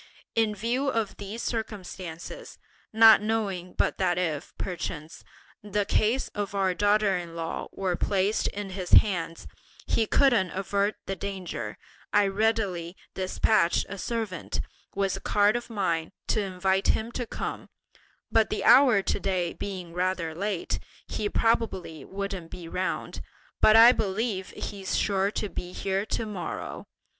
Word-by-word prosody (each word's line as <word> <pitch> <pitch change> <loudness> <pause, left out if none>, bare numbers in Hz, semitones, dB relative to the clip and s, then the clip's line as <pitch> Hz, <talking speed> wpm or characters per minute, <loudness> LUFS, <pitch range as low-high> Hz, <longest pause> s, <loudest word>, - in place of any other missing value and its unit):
In 220 -2 +2
view 240 +7 -1
of 225 -5 -1
these 205 +3 -6
circumstances, 185 -7 -5 0.3
not 225 0 +8
knowing 200 -5 -2
but - - 0
that 175 0 +2
if, 160 -4 -2
perchance, 165 -3 -5 0.4
the 205 0 -1
case 225 +7 +1
of 205 -1 -4
our 190 -2 +2
daughter 205 0 +3
in 170 -2 -5
law 165 -1 -4
were 185 -2 -1
placed 200 +3 +1
in 200 -1 -5
his 185 -1 -5
hands, 165 -5 +4 0.4
he 225 -1 +1
couldn't 235 -10 +4
avert 200 +2 0
the 195 - -3
danger, 185 - -5 0.3
I 205 0 +4
readily 195 -4 0 0.2
despatched 190 0 +2
a 200 0 -6
servant, 220 -7 -3 0.3
with 195 -1 0
a - - -10
card 205 +1 +3
of 240 0 -3
mine, 180 -6 -1 0.2
to 215 - +2
invite 190 0 0
him 225 +2 +1
to 245 -1 -4
come; - - -5 0.6
but 225 -1 +4
the 215 - -2
hour 250 -7 +7
to - - 0
day 185 -3 -1
being 185 -4 -6
rather 180 -2 -1
late, 195 +1 -2 0.3
he 210 - -2
probably 190 -11 0
won't 195 -3 -5
be 175 -2 -8
round, 185 +2 -3 0.4
but 215 - +7
I 230 +2 +10
believe 205 -3 -1
he's 195 -2 -3
sure 195 -1 +2
to 210 - -3
be 180 -2 -6
here 195 +2 -1
to 225 - -1
morrow. 205 -5 -5
195 Hz, 145 wpm, -27 LUFS, 180-215 Hz, 0.6 s, I